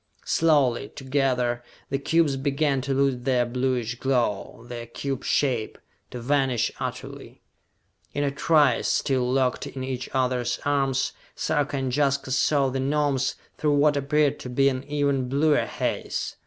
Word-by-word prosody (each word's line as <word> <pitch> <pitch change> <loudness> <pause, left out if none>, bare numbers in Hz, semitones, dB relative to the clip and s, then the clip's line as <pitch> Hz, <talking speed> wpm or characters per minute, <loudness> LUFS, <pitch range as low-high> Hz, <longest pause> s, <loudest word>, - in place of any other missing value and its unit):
Slowly, 140 -9 +2
together, 130 -2 0 0.3
the 135 - 0
cubes 155 0 +2
began 140 0 0
to 135 +1 -2
lose 135 -2 +2
their 125 -1 +2
bluish 125 -1 -1
glow, 120 -4 -1
their 120 -1 -7
cube 135 +2 -4
shape 125 -6 0 0.3
to 125 - -7
vanish 130 -2 +1
utterly. - - -7 0.7
In 145 - -1
a 140 - +1
trice, 145 -3 +3
still 130 -3 +1
locked 130 -1 +1
in 130 - -6
each 130 -1 -4
other's 125 -2 0
arms, 135 -2 +1 0.2
Sarka 145 -2 0
and 130 -2 -1
Jaska 140 -2 +1
saw 140 +1 +2
the 135 +1 -3
Gnomes 140 -1 +1 0.2
through 150 -1 +2
what 145 +1 +4
appeared 145 +1 +1
to 125 - -7
be 135 +2 +3
an 130 -1 -3
even 140 -3 0
bluer 145 +3 +2
haze. - - -3
135 Hz, 145 wpm, -25 LUFS, 125-145 Hz, 0.7 s, what